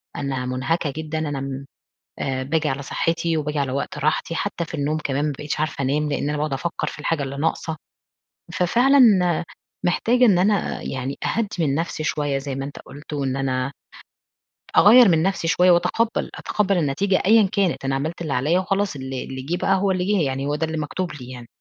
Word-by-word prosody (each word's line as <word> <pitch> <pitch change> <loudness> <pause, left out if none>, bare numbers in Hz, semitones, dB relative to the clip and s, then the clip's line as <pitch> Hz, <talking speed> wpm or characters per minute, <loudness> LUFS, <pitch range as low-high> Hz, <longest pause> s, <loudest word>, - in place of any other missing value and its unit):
أنا 135 -3 -3
مُنهَكَة 135 +4 -1
جدًا، 160 0 -4
أنا 145 -3 -3
م 135 0 -5 0.5
أ 130 -1 -2
باجي 155 +3 0
على 140 0 -2
صحّتي، 165 +3 -1
وباجي 150 -1 -2
على 135 -2 -1
وقت 140 +2 -3
راحتي. 155 +3 0
حتّى 180 -1 -2
في 165 - -10
النوم 150 +1 -1
كمان 140 +1 0
ما 150 - 0
بقيتش 150 0 -3
عارفة 155 -2 -2
أنام 150 +3 0
لإن 145 - -1
أنا 150 - -1
باقعد 150 0 -1
أفكّر 145 +5 -2
في - - -6
الحاجة 150 0 -1
اللي 135 0 -5
ناقصة. 160 +1 -1 0.8
ففعلًا 245 +10 +3 0.9
محتاجة 240 +8 +3
إن 195 -6 +5
أنا 200 +2 +1
يعني 135 +1 -4
أهدّي 225 -2 0
من 140 -4 +1
نفسي 165 0 -2
شوية 145 -2 0
زي 135 -1 -4
ما 135 0 -3
أنت 140 - -8
قُلت، 145 +2 -10
وإن 135 -2 -1
أنا 130 0 -1 1.1
أغيّر 230 +2 +8
من 160 -2 +3
نفسي 190 -3 0
شوية 180 +2 +4
وأتقبّل 180 +7 +1
أتقبّل 200 -3 0
النتيجة 175 +6 +1
أيًا 215 -1 +6
كانت. 195 -9 0
أنا 135 - 0
عملت 160 +5 -3
اللي 155 - -3
عليّا 150 +8 +2
وخلاص 195 -3 -1
اللي 130 -1 -5
اللي 130 0 -6
جِه 160 +7 -2
بقى 195 +2 +2
هو 195 +1 +1
اللي 185 -1 0
جِه. 205 0 +2
يعني 135 +1 -2
هو 145 - 0
ده 160 +2 -1
اللي 160 0 -3
مكتوب 170 +4 -3
لي 130 -4 -9
يعني. 120 -2 -9
150 Hz, 200 wpm, -22 LUFS, 135-180 Hz, 1.1 s, أغيّر